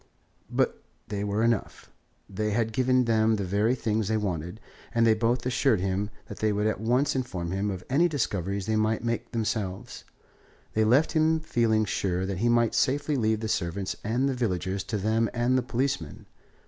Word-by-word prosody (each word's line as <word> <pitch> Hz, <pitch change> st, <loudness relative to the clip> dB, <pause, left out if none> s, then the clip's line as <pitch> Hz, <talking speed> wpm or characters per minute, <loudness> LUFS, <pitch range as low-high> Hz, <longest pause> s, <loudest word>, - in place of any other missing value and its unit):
But -, -, 0 dB, 0.3 s
they 100 Hz, -1 st, -2 dB
were 105 Hz, +2 st, 0 dB
enough. 115 Hz, -2 st, -1 dB, 0.4 s
He 105 Hz, +1 st, 0 dB
had 110 Hz, +1 st, 0 dB
given 130 Hz, +1 st, +3 dB
them 110 Hz, -1 st, +3 dB
the 100 Hz, -, -2 dB
very 105 Hz, +6 st, +1 dB
things 110 Hz, -4 st, -1 dB
they 110 Hz, +1 st, +1 dB
wanted, 90 Hz, -1 st, -3 dB, 0.4 s
and 115 Hz, 0 st, +4 dB
they 115 Hz, -, +6 dB
both 120 Hz, +3 st, 0 dB
assured 125 Hz, -3 st, +2 dB
him 95 Hz, +2 st, -1 dB, 0.2 s
that -, -, -9 dB
they 110 Hz, -1 st, +2 dB
would 105 Hz, +1 st, 0 dB
at 110 Hz, -, 0 dB
once 125 Hz, +6 st, +1 dB
inform 95 Hz, -10 st, -3 dB
him 100 Hz, +2 st, -1 dB
of 95 Hz, -2 st, -5 dB
any 155 Hz, +7 st, +3 dB
discoveries 100 Hz, -, -2 dB
they 110 Hz, 0 st, 0 dB
might 110 Hz, +1 st, +1 dB
make 115 Hz, 0 st, -2 dB
themselves. 105 Hz, -4 st, -3 dB, 0.7 s
They 110 Hz, -, +2 dB
left 130 Hz, +8 st, +4 dB
him 160 Hz, 0 st, +3 dB
feeling 115 Hz, -8 st, +1 dB
sure 95 Hz, -2 st, -1 dB
that 95 Hz, -2 st, -3 dB
he 120 Hz, +3 st, +2 dB
might 120 Hz, -1 st, +3 dB
safely 145 Hz, +3 st, +1 dB
leave 110 Hz, -3 st, +1 dB
the 110 Hz, -, -2 dB
servants 95 Hz, -1 st, -2 dB
and 120 Hz, +5 st, +1 dB
the 135 Hz, -, 0 dB
villagers 95 Hz, -5 st, -2 dB
to 105 Hz, -, -2 dB
them 110 Hz, +2 st, +1 dB
and 120 Hz, +2 st, +2 dB
the 130 Hz, -, +3 dB
policemen. 120 Hz, -, -2 dB
110 Hz, 185 wpm, -27 LUFS, 100-120 Hz, 0.7 s, they